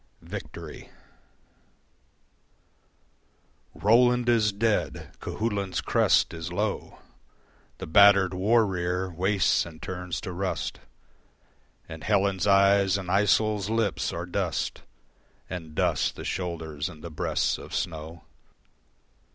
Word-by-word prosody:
Victory - - -8 2.9
Roland 120 +3 +3
is 110 -3 +3
dead, 105 +2 -1
Cuchulain's 100 -4 -2
crest - - +2
is 80 +1 -6
low, 105 +3 -3 0.8
The - - -6
battered 100 +2 +6
war 110 +5 +3
rear 90 -1 -2
wastes 95 +3 +2
and 80 -2 -11
turns 90 -1 -5
to 90 - -5
rust, 95 +1 -3 1.1
And 80 -1 -9
Helen's 100 -2 +1
eyes 100 -1 +4
and 95 -2 -6
Iseult's 105 0 +2
lips 110 -3 0
are - - -4
dust - - -2 0.7
And 80 -4 -7
dust - - +1
the - - -8
shoulders 80 -4 -3
and 80 -3 -13
the 85 - -7
breasts 75 - -1
of - - -8
snow. 80 0 -4
95 Hz, 105 wpm, -26 LUFS, 85-105 Hz, 2.9 s, battered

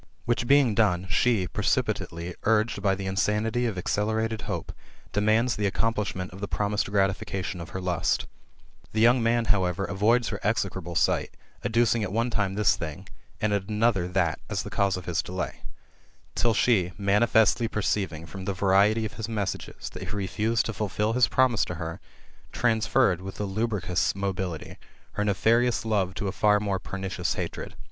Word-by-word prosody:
Which 120 0 0
being 140 -4 +5
done^ 95 -4 +2
she, 110 -3 +2
precipitately 85 0 -1
uiged 110 +1 +1
by 95 -1 +2
the 95 0 -6
insanity 105 +5 0
of 110 - -3
acceler 105 +4 0
ated 110 -1 -4
hope, - - -3 0.4
demands 110 +3 +2
the 105 -1 0
accomplishment 100 -3 -1
of 95 - -10
the 100 - -2
promised 105 +1 -1
grati 95 -1 +3
fication 95 -2 -5
of 85 - -8
her 95 - -5
lust 90 -3 0 0.7
The 110 - 0
young 120 +2 +5
man, 115 0 +2
however, 95 -1 0
avoids 110 +6 +2
her 100 - -4
exfioable 95 -5 -1
sight, - - +1 0.3
adducing 115 0 +2
at 100 -3 -2
one 115 +3 0
time 100 -3 0
this 105 0 +3
thing, 80 -3 -7 0.3
and 110 -1 +1
at 100 0 -1
another 105 -4 +2
that, 90 -3 0
as - - -2
the - - -8
cause 100 -2 +1
of 90 - -8
his 85 -2 0
delay; 90 +1 -5 0.7
till 115 -2 +1
she 95 -7 +2
manifestly 110 +3 +3
perceiving, 95 -7 -2
ftom 95 +2 -8
the 100 - 0
variety 100 +4 +3
of 110 - -5
his 110 -1 -4
messages, 105 -5 -4
that - - -9
he - - -5
refused 105 +4 0
to 115 - -3
fulfil 105 +1 -1
bis 125 +1 +4
promise 130 -4 +3
to 90 - -5
her, 80 -1 -5 0.5
transferred, 110 -6 +2
wiUi 95 +1 -8
a - - -1
lubricous 100 -4 -1
mobility, 95 -4 -4 0.3
her 105 - -2
nefitfious 115 +4 +2
love 100 -4 0
to 100 - -3
a - - -1
far 105 +1 +3
more 100 -2 -1
pernicious 95 -3 -3
hatred. - - -5
105 Hz, 175 wpm, -26 LUFS, 95-110 Hz, 0.7 s, being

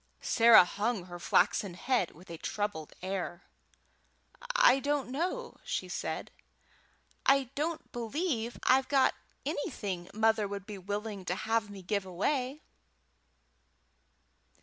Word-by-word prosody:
Sarah 230 -5 +7
hung 205 +2 -1
her 175 -1 -9
flaxen 180 +1 +2
head 240 -2 +1
with 175 +2 -15
a 165 - -6
troubled 205 -7 -3
air. 185 -2 -3 1.1
"I - - +6
don't 285 -2 -1
know," 360 - -3
said - - -3
she. - - -30 0.8
"I 275 -2 +4
don't 315 +3 -3
believe 240 0 -2
I've 260 +1 +4
got 275 -2 +4 0.3
anything 200 - -3
mother 220 0 +2
would 200 -1 -6
be 205 -2 -7
willing 205 +1 -4
to 180 - -1
have 220 +1 0
me 195 -2 -9
give 200 0 -1
away." 255 - -1
220 Hz, 120 wpm, -31 LUFS, 190-270 Hz, 1.1 s, Sarah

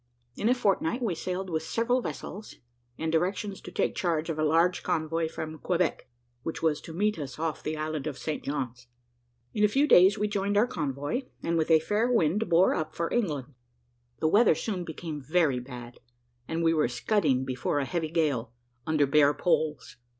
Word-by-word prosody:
In 220 - 0
a 250 - +4
fortnight 225 0 0
we 210 -6 0
sailed 185 +3 -3
with 160 -1 0
several 230 +9 0
vessels, 210 -2 -7 0.4
and 160 0 -2
directions 190 +4 -1
to - - -9
take - - 0
charge 165 -2 -1
of 155 - -5
a - - +2
large 165 +4 +3
convoy 160 +1 -1
from 155 0 -6
Quebec, 175 -5 -1 0.3
which 165 +5 -5
was 155 -2 +1
to - - -9
meet 205 +3 0
us 135 -4 -6
off 160 0 -2
the 155 0 -3
island 155 -1 -3
of 145 -3 -4
St. 155 - -4
John's. 125 -4 -4 0.7
In 210 - +1
a - - +7
few 275 +8 +2
days 190 -3 +7
we 210 +1 0
joined 205 0 0
our 215 - +5
convoy, 145 - -2 0.2
and 170 - 0
with 160 -1 +1
a 160 -1 +7
fair 210 +9 0
wind 205 -1 +2
bore 170 +2 +5
up 155 -2 -3
for 170 0 -2
England. 150 - -1 0.6
The 155 - +1
weather 205 +1 +5
soon 180 +2 -3
became 160 -2 -6
very 150 -2 +2
bad, 125 -1 -9 0.5
and 165 +1 -2
we 165 0 +4
were 155 -4 +2
scudding 135 - +1
before 130 +2 -1
a 140 - 0
heavy 160 +3 -2
gale, 140 -8 0 0.3
under 155 -2 +3
bare 145 +1 +4
poles. 155 -8 0
160 Hz, 190 wpm, -28 LUFS, 150-195 Hz, 0.7 s, a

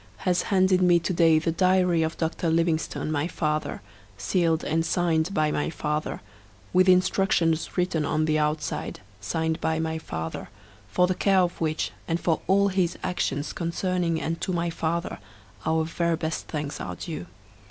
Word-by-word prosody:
has 180 -1 +3
handed 185 -1 +4
to - - +2
me 175 -1 +6
to 170 +2 -1
day 165 -2 +5
the 160 +1 0
diary 180 -1 +3
of 160 0 -1
Dr. 165 +1 -1
Livingstone, 165 -1 0
my 150 +1 0
father, 155 - -2 0.3
sealed 165 - +1
and 165 +2 0
signed 170 0 +1
by 155 -4 +1
my 150 - -1
father, 150 -1 -3 0.5
with 185 +1 +5
instructions 180 -3 +2
written 180 -3 +1
on 155 +2 +1
the 155 0 +2
outside, 150 -7 -2 0.2
signed 160 +11 -2
by 160 0 0
my 160 0 -2
father, 80 - -5 0.4
for 145 - +3
the 185 - +1
care 190 +1 +3
of 175 -1 -1
which, 155 -1 -1 0.2
and 165 0 0
for 165 -2 0
all 200 +1 +4
his 185 -3 0
actions 145 -5 -2
concerning 170 0 -1
and 165 +1 -3
to - - -1
my 170 -1 -1
father, 170 +2 -2 0.5
our 160 0 +2
very 170 +1 0
best 160 0 -3
thanks 150 -2 -4
are - - -5
due. 155 - -6
165 Hz, 170 wpm, -26 LUFS, 155-180 Hz, 0.5 s, me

